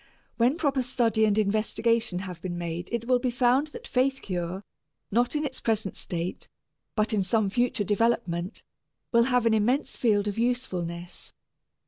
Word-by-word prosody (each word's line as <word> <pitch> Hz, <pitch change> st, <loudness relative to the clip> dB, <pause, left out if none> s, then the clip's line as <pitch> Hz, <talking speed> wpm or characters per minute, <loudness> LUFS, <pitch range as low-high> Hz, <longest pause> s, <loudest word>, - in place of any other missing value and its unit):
When 245 Hz, +6 st, +3 dB
proper 280 Hz, -5 st, +1 dB
study 235 Hz, -3 st, +2 dB
and 210 Hz, -1 st, +2 dB
investigation 220 Hz, 0 st, +1 dB
have 180 Hz, -3 st, -8 dB
been 175 Hz, -1 st, -4 dB
made 170 Hz, 0 st, -4 dB
it 235 Hz, -1 st, -2 dB
will 250 Hz, -1 st, +4 dB
be 250 Hz, 0 st, 0 dB
found 250 Hz, +4 st, +3 dB
that 295 Hz, -, -10 dB
faith 265 Hz, +1 st, +1 dB
cure, 180 Hz, +1 st, -3 dB, 0.5 s
not 240 Hz, +6 st, +2 dB
in 300 Hz, 0 st, 0 dB
its 265 Hz, -2 st, -5 dB
present 220 Hz, -3 st, 0 dB
state, 175 Hz, +1 st, -4 dB, 0.5 s
but 215 Hz, +1 st, +1 dB
in 210 Hz, -, +2 dB
some 200 Hz, +1 st, +1 dB
future 240 Hz, -1 st, +1 dB
development, 205 Hz, -3 st, 0 dB, 0.5 s
will 235 Hz, 0 st, +5 dB
have 250 Hz, -2 st, +2 dB
an 230 Hz, -, +4 dB
immense 240 Hz, +7 st, +1 dB
field 210 Hz, -4 st, +2 dB
of 205 Hz, +2 st, -2 dB
usefulness. 180 Hz, -8 st, -3 dB
225 Hz, 160 wpm, -27 LUFS, 190-245 Hz, 0.5 s, will